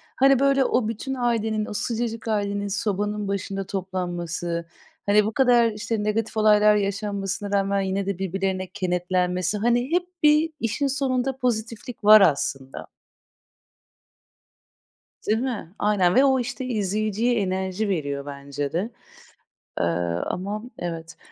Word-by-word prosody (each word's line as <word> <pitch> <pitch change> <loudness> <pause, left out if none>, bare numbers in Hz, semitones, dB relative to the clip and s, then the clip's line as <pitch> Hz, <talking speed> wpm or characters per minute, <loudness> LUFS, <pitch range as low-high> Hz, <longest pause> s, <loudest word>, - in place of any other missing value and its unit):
Hani, 270 0 +5
böyle, 275 -1 +3
o 245 -3 +1
bütün 230 +4 -4
ailenin, 225 -4 0
o - - -7
sıcacık 230 +1 -3
ailenin 205 -2 -1
sobanın 205 +1 -2
başında 195 0 -3
toplanması, 175 -3 -3 0.4
hani, 205 +1 +4
bu 215 - -1
kadar, 240 -3 +4
işte, 210 0 -3
negatif 220 +1 -1
olaylar 210 0 +5
yaşanmasına 200 0 -2
rağmen 195 0 +1
yine 190 +1 -1
de 200 -2 -2
birbirlerine 190 0 -2
kenetlenmesi, 180 0 -1
hani, 240 +5 +1
hep 355 +1 +2 0.2
bir 300 +2 +5
işin 235 +4 0
sonunda 265 -1 -1
pozitiflik 230 -1 -3
var 215 +1 +9
aslında. 135 -5 0 2.4
Değil 215 +2 +2
mi? 235 -9 -4
Aynen 195 -4 +2
ve 265 - +6
o, 265 -1 +3
işte, 250 +2 -4
izleyiciye 215 +1 0
enerji 190 +2 -1
veriyor 140 -6 -2
bence 140 0 -5
de. 180 +8 -1 0.9
Eee, - - +1 0.4
ama 205 +4 -4 0.2
evet. 165 -1 -6
205 Hz, 125 wpm, -24 LUFS, 185-230 Hz, 2.4 s, var